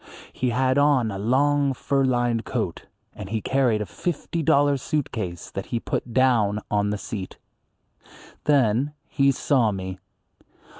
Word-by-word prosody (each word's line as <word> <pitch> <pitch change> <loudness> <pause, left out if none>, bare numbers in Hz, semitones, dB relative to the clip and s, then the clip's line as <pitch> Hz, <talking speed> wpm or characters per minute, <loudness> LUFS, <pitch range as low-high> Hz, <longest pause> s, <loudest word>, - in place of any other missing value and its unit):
He 130 - -1
had 130 +3 +2
on 140 -6 +3
a 95 - -5
long 140 +5 +2
fur 135 +2 0
lined 120 -3 +1
coat, - - -3 0.3
and 95 - -8
he 110 +1 -1
carried 125 -2 +1
a - - -6
fifty 170 - -3
dollar 145 -2 +3
suit 145 +2 -2
case 90 -6 -5
that 95 - -5
he 120 - -2
put 120 - -3
down 115 -5 +3
on 105 0 +1
the 105 - -1
seat. 100 -2 -6 1.1
Then 135 0 +2
he 140 -1 +3
saw 125 -4 +2
me. 95 -1 -5
125 Hz, 150 wpm, -24 LUFS, 105-140 Hz, 1.1 s, on